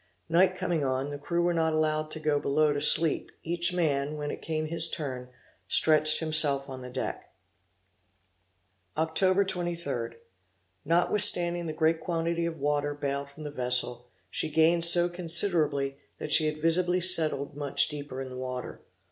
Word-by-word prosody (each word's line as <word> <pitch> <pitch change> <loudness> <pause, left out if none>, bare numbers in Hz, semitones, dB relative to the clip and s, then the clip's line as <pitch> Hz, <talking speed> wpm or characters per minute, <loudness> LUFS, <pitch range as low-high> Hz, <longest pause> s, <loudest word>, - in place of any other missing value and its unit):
Night 180 +3 +1
coming 170 -4 -4
on, 135 +1 -4
the 145 - -8
crew 170 +4 -3
were 175 0 -1
not 160 -1 -2
allowed 155 0 -2
to 155 - -1
go 150 -2 -2
below 150 +2 -1
to 145 - -5
sleep; 160 +1 +4
each 170 +2 +1
man, 150 -4 -3
when 145 0 -6
it - - -10
came 155 -1 -5
to 155 - -10
his 165 0 +4
turn, 130 -6 -7 0.4
stretched 155 0 +3
himself 155 -4 +3
on 130 -1 -10
the 125 - -10
deck. 130 +1 -7 1.7
Oct. 185 +5 0
23. 170 -11 -6 0.7
Notwithstanding 175 0 +2
the 155 - -6
great 160 +1 -1
quantity 170 0 -4
of 165 -1 -8
water 145 0 -3
bailed 140 -1 -6
from 145 +2 -14
the 150 - -8
vessel, 125 -2 -2 0.2
she 160 - -2
gained 165 +2 +2
so 175 +1 +8
considerably 165 -5 0 0.2
that - - -7
she 155 - +8
had 155 0 -5
visibly 175 +3 0
settled 155 -5 +3
much 145 -2 +4
deeper 145 -3 -9
in 135 -1 -8
the 130 - -11
water. 125 -1 -8
155 Hz, 165 wpm, -26 LUFS, 140-170 Hz, 1.7 s, so